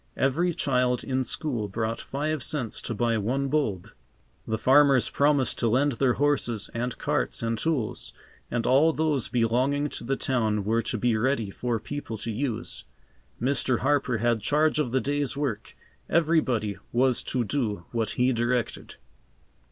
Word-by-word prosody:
Every 165 +7 +2
child 125 -2 +1
in 130 -1 0
school 125 -6 -3
brought 110 +3 -3
five 150 +2 -2
cents 120 -4 -2
to 115 - -4
buy 115 +1 +1
one 135 +6 -1
bulb. 110 - -1 0.6
The 110 - 0
farmers 135 +1 +4
promised 140 -3 +2
to 120 - +2
lend 135 +5 +3
their 125 0 +2
horses 125 -6 0
and 120 +1 -3
carts - - -1
and 115 0 0
tools, 125 -2 -2 0.4
and 120 -1 -1
all 150 +5 +4
those 155 -5 0
belonging 130 +5 +1
to - - -6
the 135 +3 0
town 110 -6 0
were 115 +2 +2
to 115 +1 -3
be 120 +1 +1
ready 115 -2 0
for 120 +2 -2
people 145 -3 -6
to 115 +2 -4
use. 120 0 -3 0.6
Mr. 130 -1 +1
Harper 135 -3 +1
had 115 0 +1
charge 150 +7 +2
of 135 -6 0
the 130 +1 +1
day's 145 +2 -1
work. 135 -8 -3 0.3
Everybody 130 - +1
was 125 +1 +2
to 125 - 0
do 105 -7 -2
what 115 -2 -1
he 125 +1 +3
directed. 120 +1 -1
125 Hz, 160 wpm, -26 LUFS, 115-140 Hz, 0.6 s, farmers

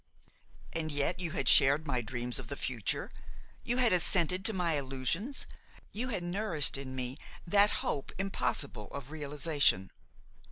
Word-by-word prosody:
And 160 -1 -2
yet 145 +5 0
you 180 -2 -2
had 135 - -1
shared 140 +4 +6
my 130 -5 -1
dreams 120 +1 -2
of - - -8
the 140 - -5
future, 115 -6 -2 0.5
you 245 - 0
had 245 -5 +3
assented 180 +1 +4
to - - +3
my 180 -5 0
illusions, 140 - -2 0.5
you 235 +5 -3
had 205 -8 -3
nourished 175 -4 +1
in 135 -1 -4
me 130 +1 -3 0.3
that 200 +4 +4 0.2
hope 140 - -3
impossible 145 - -2
of 140 0 -9
realization. 145 - +1
150 Hz, 150 wpm, -31 LUFS, 135-185 Hz, 0.5 s, shared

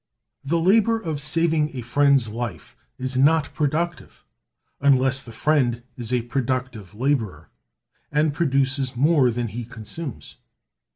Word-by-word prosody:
The 155 +5 0
labor 220 +6 +3
of 160 -8 -4
saving 155 -1 +1
a 125 - -4
friend's 140 +1 +3
life 105 - -6 0.2
is 130 0 -4
not 145 +2 +3
productive, 160 +3 -2 0.5
unless 135 -1 +3
the 120 - -12
friend 120 -2 +1
is 120 -1 -6
a 125 -2 +1
productive 125 -5 -3
laborer, 125 -4 -2 0.6
and 150 0 +2
produces 135 -3 0
more 140 0 +4
than 120 0 -2
he 120 +4 -5
consumes. 115 - -8
135 Hz, 125 wpm, -23 LUFS, 120-150 Hz, 0.6 s, more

